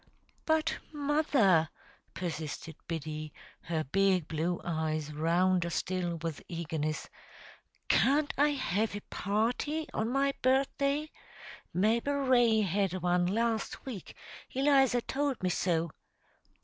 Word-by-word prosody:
"But, 315 Hz, 0 st, +1 dB
mother," 280 Hz, -, +3 dB, 0.5 s
persisted 160 Hz, -2 st, -5 dB
Biddy, 155 Hz, -2 st, -4 dB, 0.3 s
her 160 Hz, -2 st, -2 dB
big 185 Hz, +2 st, +2 dB
blue 165 Hz, +2 st, -1 dB
eyes 155 Hz, -2 st, -2 dB
rounder 170 Hz, +3 st, +2 dB
still 175 Hz, 0 st, -1 dB
with 165 Hz, -3 st, -3 dB
eagerness, 155 Hz, -3 st, -3 dB, 0.8 s
"can't 290 Hz, +2 st, +3 dB
I 290 Hz, +2 st, +4 dB
have 220 Hz, -7 st, -1 dB
a 205 Hz, -, -5 dB
party 240 Hz, +10 st, -1 dB
on 220 Hz, +1 st, -1 dB
my 275 Hz, +2 st, +2 dB
birthday? 275 Hz, +3 st, +1 dB, 0.6 s
Mabel 230 Hz, +9 st, +1 dB
Ray 245 Hz, -5 st, +4 dB
had 195 Hz, -1 st, 0 dB
one 175 Hz, 0 st, +2 dB
last 225 Hz, +2 st, -1 dB
week; 240 Hz, -8 st, -7 dB, 0.4 s
Eliza 270 Hz, -3 st, +4 dB
told 275 Hz, -3 st, -2 dB
me 180 Hz, -, +2 dB
so. 170 Hz, -3 st, 0 dB
195 Hz, 110 wpm, -31 LUFS, 165-270 Hz, 0.8 s, I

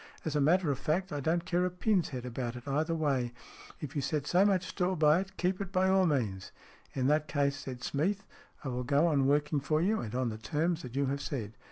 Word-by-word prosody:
As 155 Hz, -2 st, -2 dB
a 145 Hz, -, +3 dB
matter 165 Hz, +2 st, +3 dB
of 135 Hz, -, -3 dB
fact, 180 Hz, +4 st, -1 dB
I 145 Hz, -, -2 dB
don't 165 Hz, +4 st, 0 dB
care 180 Hz, 0 st, +1 dB
a 180 Hz, -, +1 dB
pin's 180 Hz, 0 st, +1 dB
head 125 Hz, -3 st, -5 dB
about 120 Hz, -1 st, -4 dB
it 125 Hz, +2 st, -10 dB
either 155 Hz, +4 st, 0 dB
way. 135 Hz, -6 st, 0 dB, 0.5 s
If 150 Hz, +1 st, -7 dB
you 145 Hz, -, 0 dB
set 150 Hz, +1 st, -1 dB
so 180 Hz, +5 st, +4 dB
much 190 Hz, -3 st, +2 dB
store 180 Hz, 0 st, -1 dB
by 155 Hz, +1 st, +5 dB
it, 190 Hz, 0 st, -6 dB
keep 185 Hz, +2 st, 0 dB
it 195 Hz, -2 st, -5 dB
by 190 Hz, 0 st, +2 dB
all 190 Hz, -1 st, +4 dB
means." 105 Hz, -, -1 dB, 0.2 s
" -, -, -27 dB
In 130 Hz, -2 st, 0 dB
that 150 Hz, +2 st, +2 dB
case," 140 Hz, -1 st, +1 dB
said 130 Hz, -3 st, -7 dB
Smeath, 190 Hz, +11 st, -1 dB, 0.2 s
" -, -, -27 dB
I 135 Hz, -, -3 dB
will 125 Hz, 0 st, -2 dB
go 140 Hz, +5 st, +3 dB
on 140 Hz, -5 st, +3 dB
working 145 Hz, +1 st, +2 dB
for 155 Hz, +3 st, 0 dB
you, 205 Hz, +6 st, +2 dB
and 110 Hz, +1 st, -5 dB
on 130 Hz, -1 st, 0 dB
the 110 Hz, -1 st, -6 dB
terms 160 Hz, +6 st, -1 dB
that 125 Hz, -1 st, -8 dB
you 140 Hz, 0 st, +2 dB
have 140 Hz, +1 st, -2 dB
said." 115 Hz, -9 st, -4 dB
150 Hz, 255 wpm, -31 LUFS, 135-180 Hz, 0.5 s, by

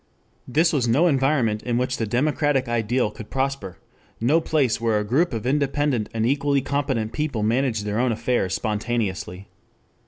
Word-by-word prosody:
This 160 Hz, +6 st, +2 dB
was 130 Hz, -5 st, +1 dB
no 135 Hz, +9 st, +3 dB
environment 135 Hz, -8 st, +2 dB
in 120 Hz, -1 st, -1 dB
which 130 Hz, +1 st, -1 dB
the 115 Hz, -, -2 dB
democratic 135 Hz, +2 st, +1 dB
ideal 120 Hz, -1 st, 0 dB
could 105 Hz, 0 st, -10 dB
prosper, 135 Hz, -8 st, -2 dB, 0.4 s
no 145 Hz, +9 st, +3 dB
place 140 Hz, -8 st, +1 dB
where 115 Hz, -2 st, +2 dB
a 105 Hz, -, 0 dB
group 135 Hz, +12 st, +1 dB
of 115 Hz, -1 st, -4 dB
independent 140 Hz, -3 st, 0 dB
and 110 Hz, -1 st, -1 dB
equally 140 Hz, +2 st, +1 dB
competent 130 Hz, -5 st, -2 dB
people 145 Hz, -8 st, -2 dB
managed 115 Hz, -1 st, 0 dB
their 105 Hz, +2 st, -1 dB
own 125 Hz, 0 st, +2 dB
affairs 115 Hz, -4 st, 0 dB
spontaneously. 105 Hz, -4 st, -3 dB
125 Hz, 160 wpm, -23 LUFS, 110-140 Hz, 0.4 s, no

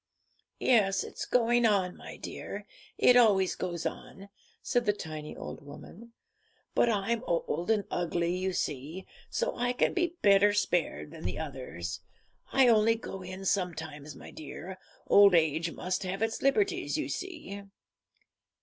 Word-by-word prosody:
'Yes, 205 Hz, -6 st, +3 dB
it's -, -, -6 dB
going 240 Hz, 0 st, +3 dB
on, 195 Hz, -5 st, +2 dB
my -, -, -10 dB
dear; -, -, -7 dB, 0.3 s
it 250 Hz, -, +6 dB
always 200 Hz, -6 st, +5 dB
goes 175 Hz, -2 st, -4 dB
on,' 195 Hz, +1 st, -6 dB, 0.3 s
said 245 Hz, -3 st, 0 dB
the 205 Hz, -, +4 dB
tiny 155 Hz, -5 st, -7 dB
old -, -, -7 dB
woman; 225 Hz, +10 st, -12 dB, 0.6 s
but 240 Hz, -, +3 dB
I'm 225 Hz, +2 st, 0 dB
old 170 Hz, +1 st, -1 dB
and 215 Hz, -2 st, +3 dB
ugly, 175 Hz, 0 st, 0 dB
you 185 Hz, +1 st, -1 dB
see, 155 Hz, +3 st, -3 dB, 0.2 s
so -, -, -1 dB
I 245 Hz, +1 st, 0 dB
can 250 Hz, -, +1 dB
be 350 Hz, -2 st, 0 dB
better 200 Hz, 0 st, +6 dB
spared 170 Hz, -, 0 dB
than -, -, -10 dB
the 90 Hz, +1 st, -3 dB
others. 130 Hz, -, -5 dB, 0.5 s
I 265 Hz, -1 st, +5 dB
only 225 Hz, -1 st, +5 dB
go 195 Hz, -4 st, -7 dB
in 185 Hz, +1 st, -7 dB
sometimes, 160 Hz, -6 st, -2 dB
my -, -, -11 dB
dear; 180 Hz, +4 st, -8 dB, 0.3 s
old 200 Hz, -2 st, +7 dB
age 160 Hz, +1 st, +2 dB
must 185 Hz, +3 st, -3 dB
have 195 Hz, +2 st, -2 dB
its 225 Hz, 0 st, -1 dB
liberties, 390 Hz, +10 st, +1 dB
you -, -, -2 dB
see.' 320 Hz, -, -6 dB
190 Hz, 150 wpm, -30 LUFS, 165-225 Hz, 0.6 s, old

